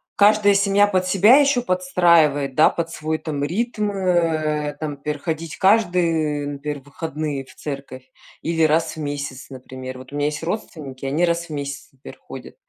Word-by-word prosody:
каждая 205 0 +5
семья 200 +1 +3
под 185 -2 0
себя 205 +8 +6
ещё 280 -4 +3
подстраивает, 170 - +2
да, 155 - +6
под 170 -1 -3
свой 155 0 -2
там 145 -3 -4
ритм, 210 +5 -1
э, 160 -6 0
там, 155 -1 -3
например, 145 +1 -5
ходить 160 -2 -4
каждые, 170 -7 +2
например, 145 0 -5
выходные 145 -1 -5
в - - -18
церковь 135 -3 -8 0.3
или 165 0 0
раз 160 +1 +2
в - - -7
месяц, 140 -3 -5
например. 130 0 -8
Вот 130 +1 -12
у - - -5
меня 145 0 0
есть 150 +2 -4
родственники, 150 -8 -5
они 150 +6 +1
раз 170 0 -1
в - - -24
месяц, 140 -1 -5
например, 135 -1 -13
ходят, - - -11
155 Hz, 170 wpm, -21 LUFS, 145-180 Hz, 0.3 s, себя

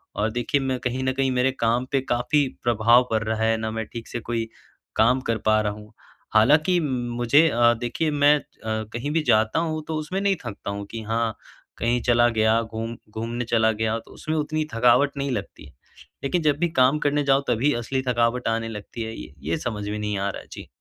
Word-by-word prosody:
और 110 +1 0
देखिए, 125 +4 0
मैं 130 -1 -1
कहीं 125 +1 -2
न 130 - +1
कहीं 135 0 0
मेरे 125 +1 +2
काम 115 +2 +1
पे 135 -1 +2
काफ़ी 135 +3 +1 0.2
प्रभाव 120 +2 +4
पड़ 110 0 +1
रहा 110 0 -1
है, 110 0 +2
ना 110 0 -3
मैं 110 0 -3
ठीक 115 -1 -7
से 120 - -4
कोई 115 0 -3 0.5
काम 125 +4 +3
कर 115 - +2
पा 110 0 +4
रहा 105 -1 -1
हूँ। 105 0 -13 0.4
हालाँकि 155 +11 +4
मुझे 125 +2 +2
अ, 120 -1 +4
देखिए 150 +6 -1
मैं 145 0 +5
अ, - - -15 0.5
कहीं 135 +5 -3
भी 165 0 +1
जाता 110 +7 +3
हूँ 155 -2 -2
तो 160 - -3
उसमें 170 +5 -3
नहीं 200 -1 +2
थकता 100 -1 -6
हूँ 100 0 -5
कि 115 -1 -5
हाँ, 115 0 -1 0.4
कहीं 120 +2 0
चला 120 -1 +4
गया, 110 0 +2
घूम 115 +1 -5
घूमने 115 +2 -4
चला 110 -1 +3
गया 110 +1 -1
तो - - -17
उसमें 155 +1 -4
उतनी 155 +1 -1
थकावट 125 +5 +3
नहीं 140 -1 -2
लगती, - - -6 0.5
लेकिन 170 +5 0
जब 145 -2 +2
भी 175 -1 +1
काम 135 +4 +4
करने 145 0 +1
जाओ 135 0 +3
तभी 125 +5 +2
असली 130 +3 -1
थकावट 120 0 +1
आने 115 0 -1
लगती 110 +2 -7
है। 110 0 -6
ये 75 - -10 0.2
ये 85 - +1
समझ 105 -4 -4
में 105 0 -3
नहीं 105 -1 -2
आ 100 0 -1
रहा - - -6
है। - - -18
जी। - - -9
120 Hz, 215 wpm, -24 LUFS, 110-140 Hz, 0.5 s, मैं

